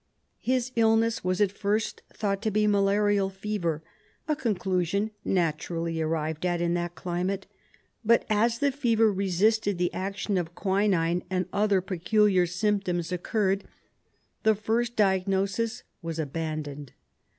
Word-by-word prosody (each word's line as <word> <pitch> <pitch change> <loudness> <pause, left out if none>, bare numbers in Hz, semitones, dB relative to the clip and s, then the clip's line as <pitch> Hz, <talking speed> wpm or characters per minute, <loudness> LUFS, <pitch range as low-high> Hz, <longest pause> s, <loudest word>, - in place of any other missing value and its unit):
His 255 0 0
illness 225 0 +3
was 185 0 0
at 200 -2 +3
first 210 +2 -1
thought 200 -2 -2
to 220 - 0
be 215 0 +2
malarial 205 -1 +3
fever, 190 -5 -3 0.4
a 305 - +1
conclusion 200 - 0
naturally 165 -1 -1
arrived 160 0 -2
at 175 -1 +1
in 170 0 +1
that 175 0 -2
climate, 185 +3 -2 0.6
but 230 +1 +4
as 225 +2 +2
the 280 +3 +2
fever 225 -5 +2
resisted 200 +2 +1
the 175 0 0
action 195 0 -2
of 175 0 -5
quinine 190 -3 +1
and 185 -1 0
other 200 -2 +3
peculiar 190 +1 +2
symptoms 180 -2 -1
occurred 195 +2 0 0.8
the 220 0 +4
first 230 +3 -1
diagnosis 195 +4 +1 0.2
was 165 -2 -4
abandoned. 150 -2 -4
195 Hz, 130 wpm, -27 LUFS, 175-215 Hz, 0.8 s, but